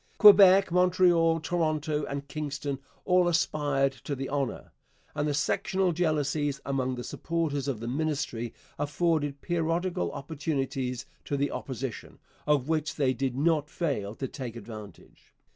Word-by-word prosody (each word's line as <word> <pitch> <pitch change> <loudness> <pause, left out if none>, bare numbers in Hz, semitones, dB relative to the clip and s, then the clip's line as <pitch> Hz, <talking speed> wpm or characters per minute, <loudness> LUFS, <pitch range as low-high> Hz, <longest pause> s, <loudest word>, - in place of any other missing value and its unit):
Quebec, 195 -3 +8
Montreal, 175 -2 +4
Toronto, 155 -3 -1
and 140 0 -5
Kingston 140 -2 -4 0.3
all 180 -1 +4
aspired 145 -5 +1
to 135 +2 -6
the 135 0 -5
honour, 140 -2 -2 0.4
and 150 0 -1
the 145 - 0
sectional 185 +5 +1
jealousies 150 -4 0
among 130 -2 -1
the 120 - -5
supporters 155 -4 -2
of 130 -6 -2
the 115 - -5
Ministry 135 -4 -2 0.3
afforded 145 -2 0
periodical 170 - -1
opportunities 135 -4 -3 0.2
to 140 - -1
the 140 +1 0
Opposition, 130 -2 -5 0.3
of 145 -3 +2
which 160 -1 -1
they 135 -3 +2
did 130 -1 -2
not 150 +1 +1
fail 120 - -2
to 135 - -3
take 125 -5 -6
advantage. 110 -5 -11
145 Hz, 135 wpm, -28 LUFS, 135-165 Hz, 0.4 s, Quebec